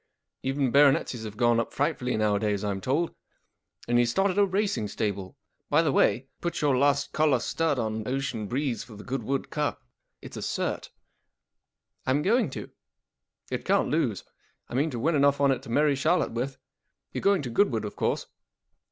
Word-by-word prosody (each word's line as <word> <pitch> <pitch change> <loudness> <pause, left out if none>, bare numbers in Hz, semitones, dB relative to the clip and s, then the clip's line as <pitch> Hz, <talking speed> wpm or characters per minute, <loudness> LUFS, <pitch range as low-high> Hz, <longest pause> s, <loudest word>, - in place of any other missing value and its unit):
Even 135 -1 0
baronetcies 135 -4 +3
have 105 -1 -8
gone 120 0 +3
up 115 - -2
frightfully 140 -5 -1
nowadays. 105 -1 +1
I'm 100 -2 -2
told. 150 - 0 0.7
And 120 0 +3
he's 120 -1 +3
started 195 +8 +1
a 200 - +5
racing 195 - 0
stable. 100 -3 -3 0.3
By 155 +3 +4
the 155 - +2
way, 130 0 +2
put 170 - -2
your 145 -3 +2
last 140 +1 +2
collar 155 -4 +3
stud 160 +3 0
on 110 -2 -2
Ocean 130 -5 -2
Breeze 130 +1 -1
for 110 - -13
the 105 - -10
Goodwood 135 +1 -3
Cup. 150 -1 -2 0.4
It's - - -10
a - - -5
cert.'* - - -2 0.6
" - - -38
I'm 140 +3 +2
going 225 - +3
to/ - - -6
1 - - -10 0.8
It - - -2
can't - - +2
lose. - - 0 0.5
1 120 - -3
mean 155 +3 +1
to 125 - -5
w 135 +8 +1
in 170 - +1
enough 140 0 +3
on 140 -1 +4
it 130 - -1
to - - -12
marry 145 +4 +3
Charlotte 155 +6 +1
with. 125 +4 -2 0.6
You - - -3
Ye - - -7
going 200 -5 +3
to 125 - -4
Goodwood, 115 - +2
of 105 - -6
course - - -1
135 Hz, 190 wpm, -27 LUFS, 115-150 Hz, 0.8 s, a